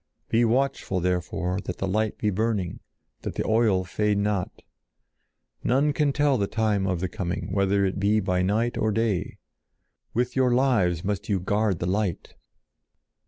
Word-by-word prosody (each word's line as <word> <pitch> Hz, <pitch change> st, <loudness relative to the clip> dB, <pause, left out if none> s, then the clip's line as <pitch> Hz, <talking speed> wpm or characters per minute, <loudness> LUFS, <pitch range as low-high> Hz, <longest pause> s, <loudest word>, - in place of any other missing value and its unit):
Be 115 Hz, +1 st, +3 dB
watchful, 125 Hz, -5 st, +1 dB
therefore, 90 Hz, +1 st, -1 dB
that 90 Hz, -, -4 dB
the 95 Hz, -, -2 dB
light 110 Hz, +3 st, 0 dB
be 105 Hz, -, 0 dB
burning, 105 Hz, -3 st, -1 dB, 0.4 s
that -, -, -5 dB
the -, -, -2 dB
oil 110 Hz, -4 st, +3 dB
fade 105 Hz, +3 st, 0 dB
not. 100 Hz, -2 st, -2 dB, 1.0 s
None 140 Hz, +4 st, +2 dB
can 145 Hz, -1 st, +2 dB
tell 145 Hz, -2 st, +2 dB
the 100 Hz, -, +1 dB
time 105 Hz, -3 st, 0 dB
of 90 Hz, -3 st, -1 dB
the 95 Hz, -, 0 dB
coming, 90 Hz, +2 st, -4 dB
whether 100 Hz, 0 st, +2 dB
it 95 Hz, 0 st, -2 dB
be 105 Hz, +2 st, +3 dB
by 90 Hz, -2 st, 0 dB
night 110 Hz, +6 st, 0 dB
or 110 Hz, -, +1 dB
day. 110 Hz, -3 st, -1 dB, 0.8 s
With 125 Hz, +1 st, 0 dB
your 130 Hz, -2 st, +3 dB
lives 100 Hz, -, +2 dB
must 100 Hz, +1 st, -3 dB
you 100 Hz, -2 st, +2 dB
guard 100 Hz, +1 st, 0 dB
the 85 Hz, -, -3 dB
light!" 95 Hz, -1 st, -2 dB
105 Hz, 165 wpm, -25 LUFS, 95-115 Hz, 1.0 s, Be